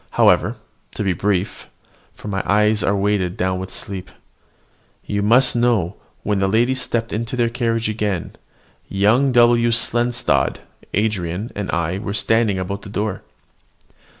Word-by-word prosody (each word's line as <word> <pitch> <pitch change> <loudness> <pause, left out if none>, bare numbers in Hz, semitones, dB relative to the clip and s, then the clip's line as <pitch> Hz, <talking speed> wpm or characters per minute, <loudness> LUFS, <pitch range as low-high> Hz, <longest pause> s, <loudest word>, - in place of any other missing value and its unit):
However, - - +4 0.4
to - - -2
be 95 -2 +1
brief 100 +1 -2 0.5
(for - - -10
my 95 -2 -1
own - - -12
eyes 105 +1 +3
are 100 - +1
weighed 100 -3 0
down 95 0 0
with 95 0 -6
sleep), 95 -2 -7 1.0
you 100 0 -1
must 120 +5 +4
know, 115 -7 +1 0.3
when 105 -2 0
the 95 - +2
ladies 120 +6 +2
stepped 115 -2 -2
into 115 +3 -3
their 120 -2 +1
carriage 115 -2 -1
again, 105 -5 -2 0.6
young 110 +8 +3
W. 120 -1 +4
Seldstadt, 120 +1 +1 0.3
Andran, 100 -1 -1
and 100 -1 -4
I 85 +2 -1
were 100 -1 -4
standing 110 -2 +2
about 100 +2 -4
the 105 - -10
door. 105 -1 -3
105 Hz, 150 wpm, -20 LUFS, 95-115 Hz, 1.0 s, However